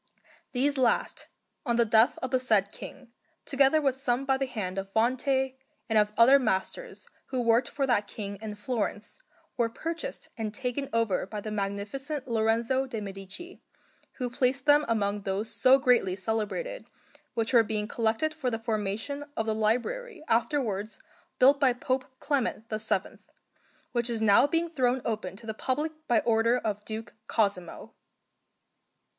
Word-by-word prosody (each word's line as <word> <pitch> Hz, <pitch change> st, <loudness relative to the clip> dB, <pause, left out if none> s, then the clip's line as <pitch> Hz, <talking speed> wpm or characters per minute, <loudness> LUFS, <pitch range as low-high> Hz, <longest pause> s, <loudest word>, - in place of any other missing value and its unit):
These 275 Hz, +2 st, +1 dB
last, 245 Hz, -2 st, +1 dB, 0.4 s
on 235 Hz, -4 st, 0 dB
the 235 Hz, 0 st, +4 dB
death 220 Hz, +2 st, +4 dB
of 255 Hz, -, -2 dB
the 255 Hz, -, +3 dB
said 215 Hz, -6 st, +2 dB
King, 265 Hz, -4 st, -10 dB, 0.3 s
together 275 Hz, +2 st, +4 dB
with 275 Hz, -3 st, +2 dB
some 260 Hz, 0 st, -1 dB
by 270 Hz, 0 st, +3 dB
the 270 Hz, 0 st, -1 dB
hand 195 Hz, -6 st, -3 dB
of 195 Hz, 0 st, -7 dB
Vante 260 Hz, +3 st, +2 dB, 0.3 s
and 220 Hz, -1 st, +3 dB
of 210 Hz, 0 st, +2 dB
other 260 Hz, +5 st, +7 dB
masters 245 Hz, -, -2 dB, 0.2 s
who 260 Hz, -, -2 dB
worked 230 Hz, +1 st, +3 dB
for 280 Hz, -1 st, -1 dB
that 210 Hz, -5 st, +1 dB
King 200 Hz, -2 st, -6 dB
in 215 Hz, -1 st, -5 dB
Florence, 210 Hz, -, -3 dB, 0.4 s
were 235 Hz, -1 st, +2 dB
purchased 330 Hz, -, -5 dB
and 220 Hz, -2 st, -4 dB
taken 270 Hz, +1 st, -3 dB
over 225 Hz, -5 st, +1 dB
by 210 Hz, +1 st, -5 dB
the 215 Hz, +1 st, -6 dB
Magnificent 210 Hz, +8 st, -3 dB
Lorenzo 230 Hz, +3 st, +1 dB
de' 230 Hz, -4 st, -4 dB
Medici, 195 Hz, -, -8 dB, 0.5 s
who 250 Hz, -1 st, -4 dB
placed 255 Hz, +2 st, +1 dB
them 295 Hz, 0 st, +5 dB
among 205 Hz, -3 st, 0 dB
those 195 Hz, +3 st, -2 dB
so 260 Hz, +1 st, +5 dB
greatly 245 Hz, -8 st, +3 dB
celebrated 225 Hz, -, -3 dB, 0.5 s
which 225 Hz, +2 st, 0 dB
were 235 Hz, -, +8 dB
being 210 Hz, -1 st, -2 dB
collected 230 Hz, +8 st, 0 dB
for 305 Hz, -5 st, -2 dB
the 225 Hz, -, -2 dB
formation 225 Hz, +5 st, -3 dB
of 225 Hz, -, 0 dB
the 220 Hz, -, 0 dB
library 305 Hz, -, -1 dB
afterwards 225 Hz, -4 st, 0 dB, 0.4 s
built 275 Hz, +2 st, +6 dB
by 260 Hz, -3 st, +4 dB
Pope 255 Hz, +1 st, -1 dB
Clement 260 Hz, -6 st, -1 dB
VII, 215 Hz, 0 st, -1 dB, 0.7 s
which 240 Hz, 0 st, +1 dB
is 230 Hz, -1 st, 0 dB
now 220 Hz, +5 st, +5 dB
being 330 Hz, +3 st, 0 dB
thrown 260 Hz, -5 st, 0 dB
open 215 Hz, -5 st, -3 dB
to 230 Hz, -, -13 dB
the 220 Hz, -, -3 dB
public 280 Hz, +8 st, -1 dB, 0.2 s
by 235 Hz, -3 st, +3 dB
order 230 Hz, +1 st, +3 dB
of 210 Hz, -3 st, -3 dB
Duke 220 Hz, 0 st, -6 dB
Cosimo. 200 Hz, -6 st, -1 dB
235 Hz, 160 wpm, -28 LUFS, 215-265 Hz, 0.7 s, were